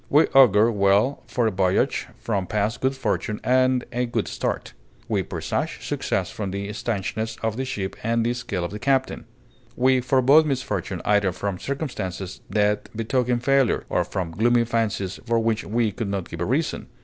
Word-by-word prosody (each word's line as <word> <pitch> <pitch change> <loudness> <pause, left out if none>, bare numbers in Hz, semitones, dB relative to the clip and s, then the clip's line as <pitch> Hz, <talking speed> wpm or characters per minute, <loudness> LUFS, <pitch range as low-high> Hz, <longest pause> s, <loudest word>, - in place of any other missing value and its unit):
We 150 +3 +5
augur 115 -4 +6
well 100 +6 +2
for 120 -2 0
a 110 - +2
voyage 95 -1 +1
from 100 -5 -2
past 105 +3 -1
good 130 +1 +1
fortune 110 -4 -2
and 130 0 +3
a 125 0 -1
good 120 - -1
start; - - -3 0.3
we - - +1
presage - - -3
success - - -1
from 100 -3 -4
the 100 +1 -4
stanchness 110 +1 -3
of 110 -1 0
the 130 +2 -2
ship 100 -7 -4
and 115 +1 +1
the 120 - +1
skill 110 -8 -3
of 85 - -5
the 105 - -6
captain. 135 +2 0 0.5
We 130 0 +3
forebode 135 +5 +5
misfortune 105 - -2
either 105 -2 +3
from 95 0 -4
circumstances 100 - -4
that 105 0 +1
betoken 120 +1 0
failure, 135 -2 +3
or - - +1
from 90 -4 -4
gloomy 120 +7 +3
fancies 110 -5 -1
for 115 0 +2
which 115 -1 +1
we 115 0 +1
could 110 -1 -4
not 100 -3 -3
give 85 - -7
a - - +1
reason. 145 - -1
115 Hz, 175 wpm, -24 LUFS, 100-125 Hz, 0.5 s, augur